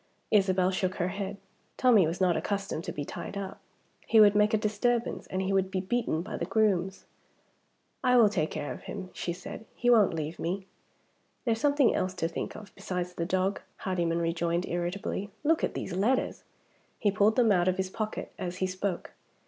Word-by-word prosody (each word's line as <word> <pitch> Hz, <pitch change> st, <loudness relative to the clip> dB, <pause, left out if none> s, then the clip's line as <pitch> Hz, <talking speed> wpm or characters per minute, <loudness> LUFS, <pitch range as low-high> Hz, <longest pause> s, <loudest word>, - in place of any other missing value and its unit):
Isabel 190 Hz, -3 st, +3 dB
shook 185 Hz, 0 st, -1 dB
her 175 Hz, 0 st, -1 dB
head. 200 Hz, +1 st, -4 dB, 0.4 s
Tommie 225 Hz, -9 st, +5 dB
was 165 Hz, +3 st, -3 dB
not 180 Hz, -2 st, +3 dB
accustomed 200 Hz, -5 st, -2 dB
to -, -, -3 dB
be 145 Hz, -, -4 dB
tied 200 Hz, -, -6 dB
up. 195 Hz, -1 st, -5 dB, 0.5 s
He 225 Hz, -, +5 dB
would 205 Hz, -1 st, +8 dB
make 210 Hz, +1 st, +4 dB
a 220 Hz, -, +3 dB
disturbance, 225 Hz, +3 st, 0 dB
and 190 Hz, 0 st, -2 dB
he 195 Hz, +1 st, 0 dB
would 190 Hz, -1 st, +2 dB
be 190 Hz, -1 st, -1 dB
beaten 185 Hz, -4 st, -1 dB
by -, -, -5 dB
the 170 Hz, -, -2 dB
grooms. 190 Hz, -2 st, +1 dB, 1.0 s
"I 250 Hz, 0 st, +5 dB
will 230 Hz, -3 st, +7 dB
take 170 Hz, -7 st, 0 dB
care 145 Hz, -, -4 dB
of -, -, -10 dB
him," 185 Hz, -1 st, -6 dB
she 175 Hz, -, -3 dB
said. 175 Hz, +5 st, -7 dB
"He 245 Hz, 0 st, +2 dB
won't 215 Hz, -7 st, +5 dB
leave 155 Hz, +1 st, -4 dB
me." 185 Hz, +3 st, -2 dB, 0.8 s
"There's 225 Hz, -2 st, +1 dB
something 285 Hz, -3 st, +4 dB
else 185 Hz, 0 st, -1 dB
to 165 Hz, -, 0 dB
think 165 Hz, -, -5 dB
of 210 Hz, -1 st, -11 dB
besides 180 Hz, -1 st, -4 dB
the 170 Hz, -1 st, -3 dB
dog," 190 Hz, +2 st, 0 dB
Hardyman 170 Hz, -3 st, -1 dB
rejoined 170 Hz, +1 st, 0 dB
irritably. 185 Hz, +3 st, -3 dB
"Look 320 Hz, +2 st, +2 dB
at -, -, 0 dB
these 190 Hz, -, -4 dB
letters!" 225 Hz, +8 st, 0 dB, 0.5 s
He 205 Hz, -, +2 dB
pulled 205 Hz, +2 st, +3 dB
them 235 Hz, -4 st, +4 dB
out 180 Hz, -2 st, +3 dB
of 185 Hz, 0 st, +2 dB
his 190 Hz, 0 st, -2 dB
pocket 215 Hz, 0 st, -4 dB
as 180 Hz, -1 st, -4 dB
he 185 Hz, -, 0 dB
spoke. 185 Hz, 0 st, -3 dB
190 Hz, 195 wpm, -29 LUFS, 180-210 Hz, 1.0 s, would